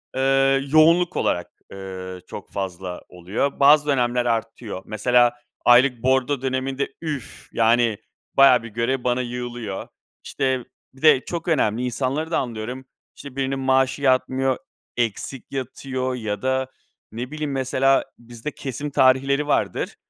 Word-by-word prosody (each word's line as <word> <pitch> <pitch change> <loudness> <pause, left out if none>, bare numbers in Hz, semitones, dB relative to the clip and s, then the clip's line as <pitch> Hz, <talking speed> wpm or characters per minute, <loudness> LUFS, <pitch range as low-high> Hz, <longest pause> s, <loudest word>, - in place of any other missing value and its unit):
ııı, 135 0 +3
yoğunluk 170 +3 +5
olarak, 85 0 -1 0.2
ııı, 95 -1 -7
çok - - -9
fazla 95 -2 -5
oluyor. 95 +12 -3
Bazı 145 +1 +6
dönemler 125 -3 +1
artıyor. 115 -3 -3
Mesela 120 +2 +3 0.3
aylık 125 0 +5
bordro 130 +1 +2
döneminde 135 +1 -2
üf! 150 -5 -6
Yani, 115 -1 +3 0.4
bayağı 135 -3 +6
bir 115 - -8
görev 120 +4 -1
bana 125 0 +1
yığılıyor. 120 -4 -5 0.4
İşte, 130 -2 -1 0.3
bir 135 - -19
de 155 -4 +5
çok 170 0 -5
önemli. 125 -7 +1
İnsanları 135 +6 -2
da - - +2
anlıyorum. 125 +2 -5 0.3
İşte, 140 -2 -11
birinin 135 0 -1
maaşı 130 +1 +2
yatmıyor, 130 0 +2 0.4
eksik 120 +3 -3
yatıyor 130 -1 -3
ya 105 -4 -4
da, 130 0 0 0.4
ne 120 +5 -6
bileyim, 155 -2 -3
mesela 135 0 +2 0.2
bizde 120 +4 -7
kesim 140 +3 -5
tarihleri 135 +2 +3
vardır. - - 0
130 Hz, 130 wpm, -23 LUFS, 120-135 Hz, 0.4 s, Bazı